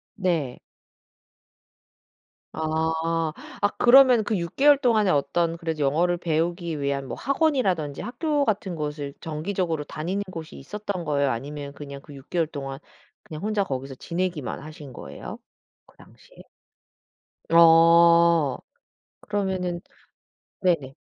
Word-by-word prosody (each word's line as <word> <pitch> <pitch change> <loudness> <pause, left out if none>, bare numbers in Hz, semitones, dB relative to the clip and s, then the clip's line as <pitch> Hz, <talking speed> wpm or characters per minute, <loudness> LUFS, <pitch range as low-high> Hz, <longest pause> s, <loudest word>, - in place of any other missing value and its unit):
네. 170 - -1 1.9
아. 160 0 -1 0.3
아 205 - +5
그러면은 250 -2 +7
그 215 -2 -1
6 170 -1 -5
개월 290 +1 +6
동안에 225 -7 +2
어떤 165 +4 0
그래도 160 -2 -4
영어를 175 +6 +2
배우기 170 -1 -1
위한 140 -1 -2
뭐 - - -5
학원이라든지 250 - 0
학교 290 +3 -1
같은 195 -4 -1
곳을 150 -2 -4
정기적으로 165 0 -2
다니는 180 +7 -3
곳이 160 -2 -8
있었던 200 +3 -5
거예요 140 -2 +1
아니면 140 +4 -6
그냥 140 -1 -9
그 145 - -13
6 135 - -14
개월 170 -3 0
동안 135 -2 -6 0.4
그냥 155 +3 -9
혼자 210 -1 +1
거기서 135 -3 -5
지내기만 170 -3 -3
하신 150 -3 -10
거예요 70 - -8 0.5
그 - - -25
당시에? - - -20 1.1
아 170 -2 +6 0.6
그러면은 190 -4 -2 0.8
네네. 160 -8 +1
165 Hz, 260 characters per minute, -25 LUFS, 145-190 Hz, 1.9 s, 그러면은